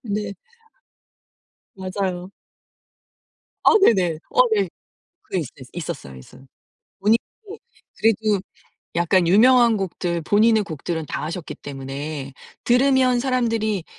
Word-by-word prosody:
네. 210 -2 -3 1.4
맞아요. 185 -1 -4 1.3
아 - - +7
네네. 180 - +3
어 - - +2
네. 410 - +1 0.5
그게 190 - -3
있어 145 - -6 0.2
있었어요. 150 - -6
있었 65 - -14 0.6
분익 210 +4 +4 0.3
부 415 +3 -9 0.4
그래도 215 -2 +2 0.5
약간 170 +1 +2
유명한 235 +4 +5
곡들 175 -2 -3
본인의 215 +5 +3
곡들은 160 -1 -4
다 - - -4
하셨기 165 +2 -5
때문에 140 +1 -6 0.3
들으면 255 0 +3
사람들이 230 -6 0
195 Hz, 225 characters per minute, -22 LUFS, 170-230 Hz, 1.4 s, 아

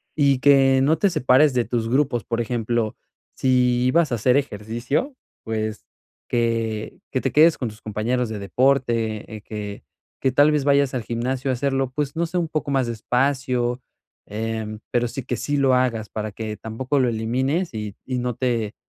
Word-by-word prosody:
y 140 -3 +3
que 135 -1 +5
no 150 +4 +3
te 200 - +3
separes 135 -2 +4
de 120 -2 +1
tus 115 -2 -2
grupos. 130 -3 +1
Por 115 -1 -2
ejemplo, 115 -1 -1 0.4
si 125 -1 +2
ibas 160 +2 +3
a - - +3
hacer 125 +4 +3
ejercicio, 120 - -2 0.3
pues, 110 -1 -3 0.4
que 115 -2 -1
que 130 - 0
te 135 - -1
quedes 155 +3 +6
con 125 - -2
tus 105 +1 -14
compañeros 115 +3 -1
de 110 -2 -5
deporte, 115 -1 0
eh, 105 - -8
que 105 -1 -7 0.4
que 130 - +2
tal 145 +4 +5
vez 150 -2 +1
vayas 140 -1 +3
al 125 - -2
gimnasio 125 +4 -2
a - - +1
hacerlo, 135 0 0
pues, 145 +1 -3
no 170 +1 0
sé, 180 - -3
un 170 -2 0
poco 155 -2 -2
más 135 -3 +1
despacio, 125 +1 0 0.4
em, 110 0 -4
pero 120 0 +1
sí, 135 - -5
que 125 - -2
sí 145 +5 -1
lo 135 -2 +3
hagas 120 -4 0
para 110 -1 -4
que 110 +1 -5
tampoco 125 +6 -2
lo 125 -2 +3
elimines 130 +10 -1
y, 105 -2 -5
y 130 -1 -2
no 125 -1 -2
te, 115 -4 -1
125 Hz, 185 wpm, -23 LUFS, 110-135 Hz, 0.4 s, quedes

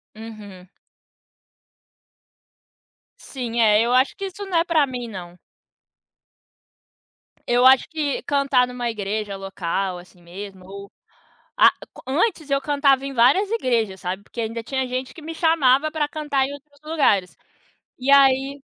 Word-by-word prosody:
Uhum. 210 -4 -11 2.5
Sim. 240 - -5
É. 215 -1 +5
Eu 235 +2 +1
acho 255 +2 +3
que, 395 - -5
isso, 390 +1 -7
não 375 -3 -1
é - - +3
pra 330 -4 +2
mim, 250 -2 -6
não. 180 -5 -9 2.1
Eu 245 +1 +3
acho 265 0 +6
que 300 -3 -2
cantar 275 -3 +2
numa 245 -1 -4
igreja 205 -1 -4
local, 195 -1 -3
assim, 175 0 -16
mesmo 190 +2 -10
ou 200 +1 -10 0.7
Ah, - - +8 0.2
co - - -14
antes, 315 - 0
eu 275 - +3
cantava 280 -1 +2
em 275 - -5
várias 270 - +3
igrejas, 230 - -1
sabe. 185 +2 -4
Porque 235 - -8
ainda 230 +1 -4
tinha 265 +3 -2
gente 255 +1 -4
que - - -13
me 325 +2 -7
chamava 310 -3 +3
pra 305 -2 -1
cantar 290 -3 -1
em 280 - -7
outros 285 0 -16
lugares. 285 - +1 0.6
E, 260 +1 -1
aí 275 0 +4
255 Hz, 145 wpm, -22 LUFS, 210-285 Hz, 2.5 s, Ah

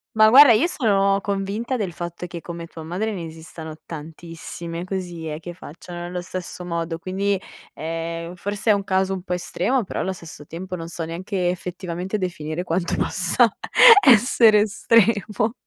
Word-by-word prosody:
Ma 215 0 +7
guarda, 275 +1 +9
io 225 +9 +4
sono 200 - +2
convinta 200 +6 -2
del 190 -6 -3
fatto 175 0 -6
che 170 -1 -7
come 170 -1 -7
tua 165 -1 -11
madre 190 +7 -3
ne 170 -4 -5
esistano 160 0 -9
tantissime 165 +1 -7
così 180 -4 -5
eh, 150 +1 -5
che 175 +1 -8
facciano 175 +1 -10
nello 175 +1 -5
stesso 180 -1 -7
modo, 165 -1 -3
quindi, 195 +2 -1 0.4
ehm, 165 +1 -4
forse 205 +4 -1
è - - +6
un 200 -1 -1
caso 190 0 0
un 185 - -4
po' 180 0 -4
estremo, 190 +7 -1
però - - -5
allo 190 - -1
stesso 160 -4 -12
tempo 180 +3 -6
non 165 -1 -7
so 165 -1 -5
neanche 180 +2 -2
effettivamente 180 +2 -4
definire 175 -3 -4
quanto 175 0 -1
possa - - +2 0.6
essere 225 -4 +6
estremo. 220 0 +2
180 Hz, 165 wpm, -22 LUFS, 170-200 Hz, 0.6 s, guarda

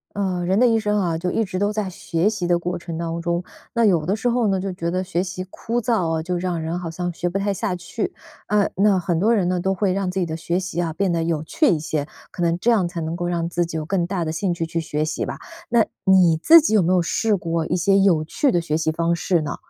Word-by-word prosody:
呃， 185 -3 -1
人 190 +4 +2
的 250 - +6
一 225 -1 +3
生 210 -1 0
啊， 170 -4 0
就 180 +2 -2
一 225 - +1
直 185 -2 -4
都 205 +2 +1
在 210 -3 -2
学 170 +2 0
习 205 -5 -3
的 175 0 +3
过 175 +1 -3
程 170 -1 -6
当 165 0 -3
中。 170 +1 -1 0.3
那 235 -1 +2
有 170 -7 +3
的 190 - +1
时 220 +3 -1
候 240 -1 +1
呢， 195 -2 +1
就 195 0 -3
觉 170 -2 -4
得 185 +2 0
学 185 -1 -1
习 185 0 -5
枯 235 +4 -3
燥 220 -7 +1
哦， 160 -1 -1
就 180 +2 -2
让 175 -2 -2
人 165 +2 -2
好 175 -2 -5
像 175 +2 -3
学 175 +1 -2
不 175 - -4
太 200 +1 0
下 195 -1 -2
去。 180 - -4 0.3
呃， 210 -1 +2
那 200 0 +4
很 175 -2 0
多 220 +7 +3
人 190 -5 +1
呢， 180 0 0
都 190 +2 0
会 190 0 +1
让 195 0 -1
自 185 +1 -2
己 - - +1
的 160 -1 -4
学 170 +2 -1
习 180 -2 -3
啊， 165 -2 -1
变 195 +3 0
得 165 -1 0
有 165 -2 -1
趣 300 - +1
一 170 - +3
些， 150 -2 -2 0.2
可 175 - -5
能 170 0 +2
这 240 - +2
样 210 -6 +3
才 170 0 -5
能 160 +1 -3
够 175 0 -3
让 170 -1 -1
自 175 0 0
己 165 - -6
有 155 - -2
更 175 +1 0
大 180 -2 -2
的 155 - -2
兴 175 +3 -1
趣 170 - -2
去 165 +1 -3
学 155 -1 -2
习 155 - -2
吧。 - - -6 0.3
那 235 -2 +4 0.2
你 185 -4 +5
自 330 - +8
己 295 -8 0
有 210 - +5
没 175 +2 +2
有 180 -1 +3
试 215 +6 +1
过 165 -3 -1
一 - - -1
些 195 +3 +3
有 190 -5 +4
趣 260 - +1
的 175 - +2
学 155 -2 -1
习 160 0 0
方 170 +1 0
式 175 0 +1
呢？ 145 -1 -4
180 Hz, 310 characters per minute, -22 LUFS, 170-195 Hz, 0.3 s, 自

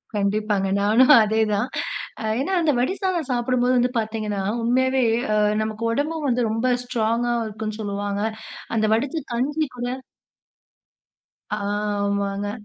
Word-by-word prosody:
கண்டிப்பாங்க 205 -1 0
நானும் 230 +7 +5
அதே 220 +1 +1
தான். 210 +4 0 0.5
அ - - -5 0.2
ஏன்னா 300 +8 -1
அந்த 320 -2 +3
வடி 255 +9 +1
சாதம் 360 -6 -1
சாப்பிடும்போது 250 +1 +1
வந்து 245 0 +2
பாத்தீங்கன்னா, 215 -2 -3 0.2
உண்மையாவே 260 +2 +2 0.3
அ - - +2 0.3
நமக்கு 215 +1 -4
உடம்பும் 300 +5 -1
வந்து, 250 -1 +1
ரொம்ப 230 +3 +1
ஸ்ட்ராங்கா 240 0 0
இருக்கும்ன்னு 215 0 -5
சொல்லுவாங்க. 205 0 -3 0.5
அந்த 215 -1 +2
வடிசா 285 +7 -2
கஞ்சி 290 +6 0
கூட 245 0 -3 1.7
ஆமாங்க. 200 -1 -1
225 Hz, 125 wpm, -23 LUFS, 210-255 Hz, 1.7 s, நானும்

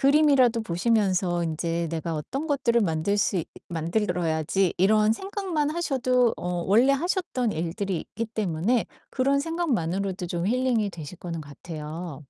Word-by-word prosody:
그림이라도 275 -5 +5
보시면서 185 -2 +1
인제 165 +1 -1
'내가 165 0 -3
어떤 265 - -4
것들을 260 -5 +2
만들 170 +4 0
수 195 - +1
있 170 - -1 0.2
만들어야지.' 170 0 0
이런 215 +3 +4
생각만 370 - -2
하셔도 255 -7 +2
어 175 -1 -2
원래 240 +7 +5
하셨던 315 - 0
일들이 170 +2 -2 0.2
있기 230 +1 -2
때문에 215 +1 0 0.2
그런 275 +1 +2
생각만으로도 195 - -1
좀 175 +1 -2
힐링이 240 -3 +1
되실 165 0 -9
거는 165 -2 -5
같아요. 155 +1 -7
200 Hz, 330 characters per minute, -26 LUFS, 170-255 Hz, 0.2 s, 그림이라도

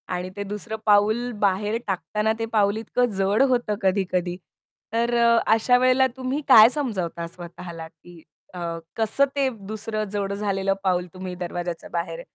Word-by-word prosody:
आणि 180 +1 -4
ते 205 - -4
दुसरं 210 +2 -5
पाऊल 215 +4 +3
बाहेर 205 +3 +1
टाकताना 210 +4 -1
ते 225 - -1
पाऊल 205 -1 +2
इतकं 245 +3 0
जड 195 +4 +2
होतं 240 -4 +1
कधी-कधी. 185 -2 0 0.6
तर 235 +1 +1
अ, 235 0 +5 0.2
अशा 245 +3 +4
वेळेला 255 +1 +4
तुम्ही 260 +3 -2
काय 225 -3 +9
समजावता 190 - -3
स्वतःला 170 -1 -9
की 165 +1 -17 0.3
अ, 180 - -7 0.4
कसं 225 +5 +2
ते 275 -2 +2 0.2
दुसरं 215 0 -3
जड 200 -1 -2
झालेलं 195 -1 0
पाऊल 180 -1 +1
तुम्ही 185 -1 -6
दरवाज्याच्या 175 -1 -5
बाहेर 170 -1 -3
205 Hz, 150 wpm, -24 LUFS, 180-230 Hz, 0.6 s, काय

